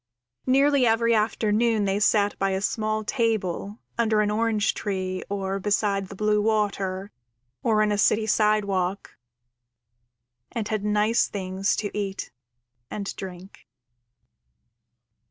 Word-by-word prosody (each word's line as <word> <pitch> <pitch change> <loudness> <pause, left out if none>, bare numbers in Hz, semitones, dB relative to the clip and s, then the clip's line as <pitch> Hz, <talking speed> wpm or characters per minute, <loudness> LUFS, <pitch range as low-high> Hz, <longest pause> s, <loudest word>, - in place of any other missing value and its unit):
Nearly 275 0 +4
every 230 +1 +3
afternoon 215 0 +1
they 195 +1 0
sat 205 -1 +3
by 195 - +1
a - - -1
small 215 +1 -1
table 215 -3 -1 0.2
under 220 -2 +3
an 210 0 +1
orange 220 -1 +1
tree, 185 -2 -3
or 195 -1 -2
beside 200 -1 0
the 200 - -10
blue 210 +1 +1
water, 200 -3 -1 0.5
or 215 -1 +3
on 210 - +1
a 205 - 0
city 215 +1 +3
sidewalk, 200 -3 0 1.4
and 220 -3 -3
had 215 -2 -1
nice 210 +2 +2
things 190 0 -1
to 205 - -4
eat 200 -2 -4 0.6
and 200 -2 -5
drink. 185 -4 -10
210 Hz, 120 wpm, -25 LUFS, 195-220 Hz, 1.4 s, Nearly